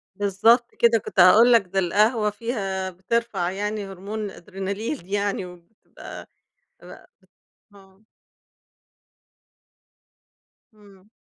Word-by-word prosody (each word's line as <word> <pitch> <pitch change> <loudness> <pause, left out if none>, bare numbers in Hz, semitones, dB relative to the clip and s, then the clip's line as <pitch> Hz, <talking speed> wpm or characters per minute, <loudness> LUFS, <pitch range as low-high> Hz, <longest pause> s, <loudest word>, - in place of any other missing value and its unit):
بالضبط 215 +5 +2
كده، 235 -1 +4
كنت 195 - -5
هاقول 220 +7 +7
لك 230 - +6
ده 195 +2 -1
القهوة 210 +4 +2
فيها 200 -4 -4
بترفَع 185 -1 -2
يعني 205 +1 -4
هرمون 195 +3 -7
الأدرينالين 195 - -6
يعني 200 -1 -1
وبتبقى 180 +4 -13 0.5
ب - - -16
بت - - -14 0.7
آه. 195 0 -21 2.7
إمم. 200 -2 -21
200 Hz, 95 wpm, -23 LUFS, 190-220 Hz, 2.7 s, هاقول